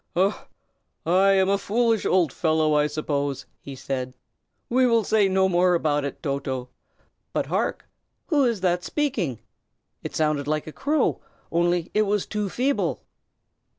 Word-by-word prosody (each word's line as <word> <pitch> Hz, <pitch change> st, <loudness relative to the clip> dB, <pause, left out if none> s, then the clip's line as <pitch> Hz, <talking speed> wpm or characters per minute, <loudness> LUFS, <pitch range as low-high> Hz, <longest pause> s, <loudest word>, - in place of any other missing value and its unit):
"I 190 Hz, +4 st, +3 dB, 1.0 s
am 190 Hz, -1 st, +3 dB
a 200 Hz, 0 st, +2 dB
foolish 225 Hz, +2 st, +1 dB
old 170 Hz, -7 st, +2 dB
fellow, 155 Hz, -2 st, +1 dB
I 150 Hz, 0 st, +3 dB
suppose!" 145 Hz, -2 st, -2 dB, 0.2 s
he 140 Hz, -, -8 dB
said. 130 Hz, -1 st, -4 dB, 0.5 s
"We 255 Hz, +1 st, +3 dB
will 230 Hz, -2 st, +3 dB
say 205 Hz, 0 st, +3 dB
no 190 Hz, 0 st, +3 dB
more 180 Hz, 0 st, +3 dB
about 150 Hz, -3 st, +1 dB
it, 140 Hz, +3 st, -6 dB
Toto. 135 Hz, -3 st, -3 dB, 0.6 s
But, -, -, 0 dB
hark? -, -, -2 dB, 0.4 s
who 300 Hz, -6 st, +2 dB
is 230 Hz, -6 st, 0 dB
that 180 Hz, -1 st, +1 dB
speaking. 195 Hz, -, -1 dB, 0.6 s
It -, -, -7 dB
sounded 150 Hz, -2 st, 0 dB
like 155 Hz, 0 st, -1 dB
a 155 Hz, -, -7 dB
crow, 300 Hz, +2 st, 0 dB, 0.3 s
only 175 Hz, 0 st, +1 dB
it 215 Hz, 0 st, +2 dB
was 205 Hz, -1 st, 0 dB
too 210 Hz, -2 st, -3 dB
feeble." 265 Hz, +7 st, -1 dB
175 Hz, 150 wpm, -24 LUFS, 150-210 Hz, 1.0 s, I